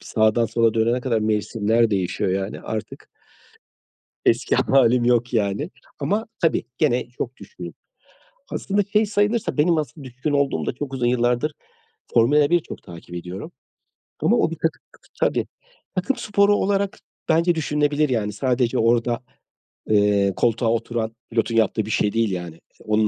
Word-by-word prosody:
Sağdan 110 +1 +2
sola 115 +1 +2
dönene 115 +2 +2
kadar 120 -3 0
mevsimler 110 +1 +1
değişiyor 95 -1 0
yani. 95 +2 -2
Artık 110 -1 -6 1.2
Eski - - +2
hâlim 125 -2 +3
yok 120 0 +2
yani. 105 - 0 0.3
Ama, 215 +3 -1
tabii, 165 - +2
gene 125 -5 +1
çok 125 0 -6
düşkünüm. 470 - -9 0.8
Aslında 205 +1 0
şey 215 0 +4
sayılırsa 205 +1 0
benim 165 +2 +4
asıl 150 -1 -5
düşkün 135 +4 -4
olduğumda 140 - 0
çok 135 0 -5
uzun 125 -2 0
yıllardır 125 +4 +1 0.6
Formula 145 +5 +4
1 175 0 +4
çok - - -10
takip 85 0 -11
ediyorum. 90 - -7 0.7
Ama - - +3
o - - +2
bir - - -5
takım - - -2 0.4
Tabii, - - +2
tabii. - - -1 0.5
Takım 200 +8 0
sporu 205 0 +3
olarak 200 0 0 0.3
bence 170 +2 +3
düşünülebilir 150 -1 +1
yani. 110 -5 -1
Sadece 125 +1 0
orada, 120 +1 +2 0.7
eee, 100 -2 +3
koltuğa 115 0 +1
oturan 115 0 -2 0.2
pilotun 115 0 0
yaptığı 110 -1 +2
bir 110 - -5
şey 105 0 +1
değil 115 -3 +1
yani. 85 -3 -5
İii, - - -23
onun 110 0 +2
120 Hz, 150 wpm, -22 LUFS, 110-150 Hz, 1.2 s, şey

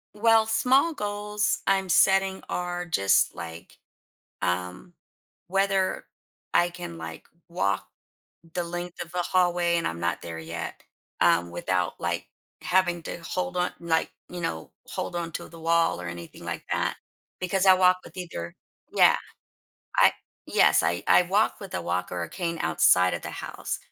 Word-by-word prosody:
Well, 225 +1 +5
small 260 +8 +3
goals 210 -2 -1
I'm 195 -1 +2
setting 190 +2 +4
are 175 0 -2
just, 100 - +3
like, 85 -1 -9 0.6
um, 90 - -2 0.6
whether 195 0 +1 0.5
I 175 - +5
can, 175 - -8
like, 80 0 -8 0.2
walk 135 - -1 0.7
the 175 - -1
length 175 +1 -5
of 170 - -16
the 180 -1 -1
hallway- 175 -2 +2
and 170 - 0
I'm 85 0 -4
not 85 - -1
there 80 -1 -6
yet- 85 +1 -6 0.4
um, 85 0 +4
without, 90 0 -1
like, 85 0 -2 0.3
having 175 -2 +2
to - - -5
hold 180 +2 -3
on 180 0 +1
like, 165 -1 0 0.2
you 175 -1 -6
know, 80 - -4 0.2
hold - - -4
on 170 -1 -3
to - - -5
the 165 - -12
wall 165 - +2
or 90 - -5
anything 85 -1 -8
like - - -4
that - - 0 0.4
because 185 +1 0
I 190 - +9
walk 185 0 +5
with - - -14
either 160 - -6 0.4
Yeah, - - +6 0.8
I - - +6 0.3
Yes, - - +4
I 85 - 0
I - - +6
walk 200 +6 +1
with 195 -2 -9
a - - -2
walker 90 0 -2
or - - -4
cane 170 -3 -3
outside 90 0 +4
of - - -4
the - - -5
house, - - -5
175 Hz, 160 wpm, -26 LUFS, -, 0.8 s, I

